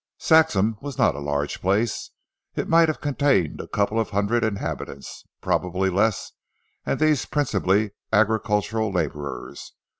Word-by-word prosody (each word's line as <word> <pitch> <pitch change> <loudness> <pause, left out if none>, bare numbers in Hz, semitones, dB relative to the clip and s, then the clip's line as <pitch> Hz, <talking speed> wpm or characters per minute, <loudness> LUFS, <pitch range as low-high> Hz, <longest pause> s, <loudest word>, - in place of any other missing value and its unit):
Saxham 115 - +3
was 140 -3 -6
not 80 - +3
a 70 - -7
large 70 0 -2
place. 105 +4 0 0.5
It - - -2
might 165 0 +5
have 155 - -2
contained 140 - +1
a - - -10
couple 105 +2 0
of 110 - -1
hundred 105 +4 0
inhabitants, 100 -9 -4 0.2
probably 90 +1 0
less, 100 +3 0 0.6
and - - 0
these 155 -2 +2
principally 105 -7 +1 0.2
agricultural 110 0 +1
labourers. 75 -7 -4
105 Hz, 130 wpm, -24 LUFS, 95-120 Hz, 0.6 s, might